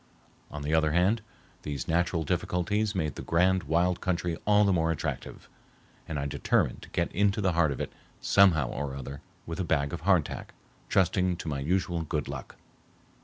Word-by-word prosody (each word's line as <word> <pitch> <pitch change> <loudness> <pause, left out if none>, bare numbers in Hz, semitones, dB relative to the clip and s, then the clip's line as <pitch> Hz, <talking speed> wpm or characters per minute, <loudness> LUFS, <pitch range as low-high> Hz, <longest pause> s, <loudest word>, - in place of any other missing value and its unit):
On 75 0 -6
the 75 +2 -1
other 80 -1 +3
hand, 95 +6 +3 0.4
these 70 -3 -4
natural 85 0 +1
difficulties 100 +7 0
made 80 -5 -1
the - - -7
grand 90 +2 +2
wild 85 +4 +1
country 90 -2 -1
all 105 0 +5
the 100 - +3
more 80 -2 +2
attractive, 80 - -4 0.6
and 80 - -3
I 70 - -2
determined 70 - 0
to - - -12
get 85 - -1
into 100 +2 +2
the 95 -3 +2
heart 80 -3 +3
of 70 - -4
it - - -4 0.3
somehow 85 -9 +4
or 70 0 -4
other 70 +1 -7 0.2
with 85 +2 -5
a - - +1
bag 70 -4 0
of - - -4
hardtack, - - 0 0.3
trusting 90 -1 +2
to - - -7
my 70 -3 -2
usual 85 +3 0
good 80 - -2
luck. - - -7
85 Hz, 180 wpm, -28 LUFS, 75-95 Hz, 0.6 s, all